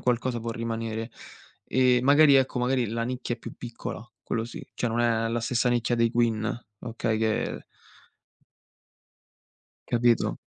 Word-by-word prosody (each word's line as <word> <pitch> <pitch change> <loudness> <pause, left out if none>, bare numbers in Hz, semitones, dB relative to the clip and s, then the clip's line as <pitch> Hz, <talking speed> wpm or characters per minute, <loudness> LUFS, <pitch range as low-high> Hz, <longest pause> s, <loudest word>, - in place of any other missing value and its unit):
qualcosa 125 -1 0
può 115 - -4
rimanere. 115 0 -4 0.5
Ehm, 125 -1 +3
magari 145 +1 +6
ecco, 130 -1 +2
magari 125 0 +1
la 115 +2 -2
nicchia 125 0 -3
è - - -18
più - - -8
piccola 115 -2 -7 0.2
quello 115 - -2
sì, 120 - -8
cioè 125 - -1
non 115 +1 -2
è 115 -1 +2
la 115 - -1
stessa 120 +1 +1
nicchia 120 0 +1
dei 115 -1 +2
Queen, 115 -1 0
okay, 115 -2 -2
che 110 -1 -1 2.3
Capito? 120 -1 +2
120 Hz, 145 wpm, -27 LUFS, 115-125 Hz, 2.3 s, magari